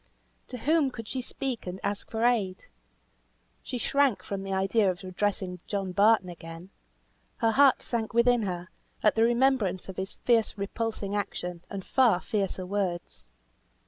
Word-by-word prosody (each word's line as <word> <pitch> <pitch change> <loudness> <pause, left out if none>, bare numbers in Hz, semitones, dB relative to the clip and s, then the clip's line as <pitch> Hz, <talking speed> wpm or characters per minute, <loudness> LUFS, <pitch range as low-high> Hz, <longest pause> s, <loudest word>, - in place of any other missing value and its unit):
To 250 - -6
whom 300 +2 +2
could 225 -4 -8
she 260 - -3
speak 250 -3 -4
and 180 +1 -5
ask 200 0 -3
for 225 0 -2
aid? 210 -6 +1 1.0
She 255 - -5
shrank 255 -6 +2
from 195 0 -4
the 195 0 -5
idea 195 +2 +2
of 185 +1 -4
addressing 185 -1 -2
John 195 -2 -2
Barton 205 0 +4
again; 170 +1 -9 0.7
her 225 - +2
heart 275 +2 +5
sank 230 -2 -2
within 235 0 +4
her, 180 -3 -4 0.3
at 210 - +5
the 225 - +1
remembrance 235 -6 +2
of 190 - -7
his 190 0 -4
fierce 230 -3 +1
repulsing 205 0 -3
action, 180 -4 -4
and 195 -2 -6
far 240 -9 +4
fiercer 195 -3 -2
words. 180 - -3
205 Hz, 155 wpm, -28 LUFS, 185-235 Hz, 1.0 s, heart